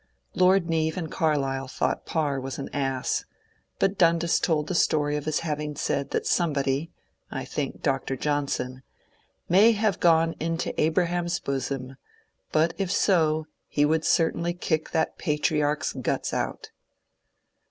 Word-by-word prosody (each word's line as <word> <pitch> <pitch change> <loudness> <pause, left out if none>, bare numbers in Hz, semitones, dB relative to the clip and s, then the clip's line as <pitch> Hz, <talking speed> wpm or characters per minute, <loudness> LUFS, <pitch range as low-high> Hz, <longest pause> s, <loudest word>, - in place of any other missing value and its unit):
Lord 185 -1 +4
Neave 160 -1 0
and 160 -4 -4
Carlyle 135 -4 0
thought 130 - -2
Parr 145 -4 0 0.2
an 140 - -5
ass; 135 -2 -1 0.5
but 195 0 0
Dundas 170 -1 +3
told 155 -3 +1
the - - -2
story 150 -3 +2
of 150 0 -3
his 155 -1 0
having 150 -2 -3
said 140 -1 -1
that - - -1
somebody 145 -2 0 0.4
(I - - -5
think - - -4
Dr. 135 - 0
Johnson) 140 -2 -1
'^ - - -18 0.7
may 210 +6 +6
have 210 -3 0
gone 165 -1 +4
to 165 +1 -2
Abraham's 175 +2 +1
bosom, 135 -1 -3 0.5
but 160 +2 +2
if 190 -2 -1
so 160 -6 +2 0.2
he 145 - +2
would 160 +1 +1
certainly 170 +1 +1
kick 160 -3 -1
that 160 - -1
patriarch's 150 -2 0
guts - - -2
out." - - -3
155 Hz, 140 wpm, -26 LUFS, 145-170 Hz, 0.7 s, may